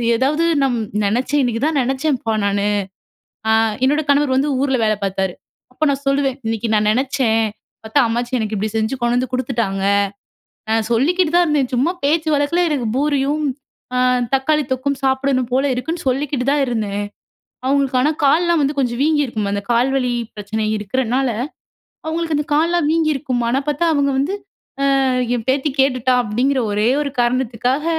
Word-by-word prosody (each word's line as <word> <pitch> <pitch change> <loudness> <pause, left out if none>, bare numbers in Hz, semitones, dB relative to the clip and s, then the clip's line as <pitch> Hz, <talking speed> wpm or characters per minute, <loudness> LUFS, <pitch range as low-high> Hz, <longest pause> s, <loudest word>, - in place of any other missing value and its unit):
ஏதாவது 290 +7 +1 0.2
நம் 250 -3 +1 0.3
நினைச்சேன் 255 +8 +1
இன்னைக்கு 240 0 -1
தான் 315 -3 +1
நினச்சேன்ப்பா 265 -2 -1
நானு, 200 0 0 0.8
அ - - +4 0.3
என்னோட 295 +3 +2
கணவர் 285 -1 +3
வந்து 280 +3 +1
ஊர்ல 270 -1 +1
வேல 215 0 +2
பாத்தாரு. 190 -1 -1 0.4
அப்ப 305 - -1
நான் 280 0 -3
சொல்லுவேன், 275 -1 +1
இன்னைக்கி 225 0 -2
நான் 210 0 +2
நினச்சேன். 245 -3 +1 0.4
பாத்தா 220 +6 +2
அம்மாச்சி 240 +2 -1
எனக்கு 215 0 -2
இப்பிடி 210 +1 -2
செஞ்சு 220 +3 0
கொண்டு 240 0 +1
வந்து 250 0 -1
குடுத்துட்டாங்க, 230 -7 -1 0.9
நான் 220 -1 +1
சொல்லிக்கிட்டு 320 +8 +2
தான் 350 - +5
இருந்தேன். 290 -5 +1
சும்மா, 270 +8 +2
பேச்சு 315 +2 +1
வழக்குல 290 +5 +1
எனக்கு 270 -6 -1
பூரியும் 285 +1 0 0.5
அ - - +2 0.4
தக்காளி 300 +3 +2
தொக்கும் 270 +2 -1
சாப்பிடணும் 265 -1 +1
போல 265 +2 +2
இருக்குன்னு 320 +7 -4
சொல்லிக்கிட்டு 265 0 -1
தான் 290 0 +2
இருந்தேன். 210 -4 -2 0.6
அவங்களுக்கு 275 -1 +1
ஆனா, 290 +4 +3
காலல்லாம் 335 +3 +3
வந்து 285 +1 0
கொஞ்சம் 245 -2 0
வீங்கியிருக்கும். 285 -9 0
அந்த 200 0 -2
கால் 240 +3 +2
வலி 250 -2 0 0.2
பிரச்சனை 215 +1 -3
இருக்கிறனால, 255 +5 -1 0.8
அவுங்களுக்கு 325 -1 -1
அந்த 295 - -2
கால்லலாம் 330 0 +2
வீங்கியிருக்கும். 295 -6 0
ஆனா 250 +3 +1
பாத்தா 295 +3 0
அவுங்க 280 -1 +2
வந்து, 290 +9 0 0.5
அ - - +2 0.5
என் 230 - -5
பேத்தி 275 +3 +1
கேட்டுட்டா! 255 -1 +2
அப்பிடிங்கிற, 250 +5 0
ஒரே 210 +2 +1
ஒரு 285 - -3
காரணத்துக்காக, 250 +3 0
265 Hz, 155 wpm, -19 LUFS, 235-290 Hz, 0.9 s, தான்